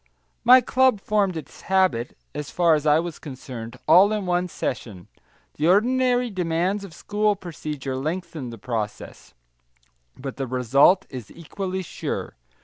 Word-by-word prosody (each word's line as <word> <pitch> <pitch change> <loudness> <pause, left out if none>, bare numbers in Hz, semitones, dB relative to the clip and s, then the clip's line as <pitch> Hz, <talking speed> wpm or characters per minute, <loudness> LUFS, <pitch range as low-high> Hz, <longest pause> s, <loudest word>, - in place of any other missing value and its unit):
My 250 +2 +8
club 255 -2 +3
formed 200 -4 0
its 155 - -10
habit, 185 -11 +1 0.2
as 150 - -5
far 170 -2 +3
as 150 0 0
I 150 +1 +6
was 170 0 -3
concerned, 125 -4 -8
all 185 +6 +7
in 210 -2 -1
one 180 0 0
session; 105 - -5 0.5
the 155 - +1
ordinary 245 +5 +3
demands 180 +2 -1
of 195 - -9
school 210 0 0
procedure 150 -7 -6
lengthen 155 -1 -4
the 115 - -9
process, 110 -2 -5 0.8
but 135 0 -7
the 135 -2 -3
result 130 - +4
is 125 -6 -8
equally 185 +3 -5
sure. - - -5
170 Hz, 145 wpm, -24 LUFS, 135-195 Hz, 0.8 s, My